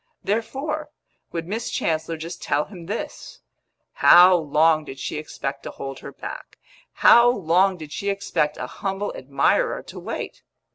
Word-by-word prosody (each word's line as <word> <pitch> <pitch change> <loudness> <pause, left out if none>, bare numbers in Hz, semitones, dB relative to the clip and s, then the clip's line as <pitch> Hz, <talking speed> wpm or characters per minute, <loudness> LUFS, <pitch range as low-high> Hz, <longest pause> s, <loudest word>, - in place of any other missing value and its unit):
Therefore, 275 +9 -2 0.4
would 165 -1 -4
Miss 225 +5 -3
Chancellor 160 0 -1
just 165 +2 -7
tell 145 +1 0
him 175 -5 -11
this: 210 +4 -6 0.5
How 180 +1 +8
long 155 0 +3
did 135 -2 -9
she 140 - -4
expect 140 -2 -5
to - - -7
hold 135 -1 -7
her - - -9
back; - - -9 0.5
how 235 +1 +8
long 190 -3 +2
did 155 -3 -10
she 200 +7 -3
expect 175 -6 -1
a - - -4
humble 195 +1 -4
admirer 135 +1 +1
to - - -10
wait? - - -6
170 Hz, 150 wpm, -23 LUFS, 150-200 Hz, 0.5 s, How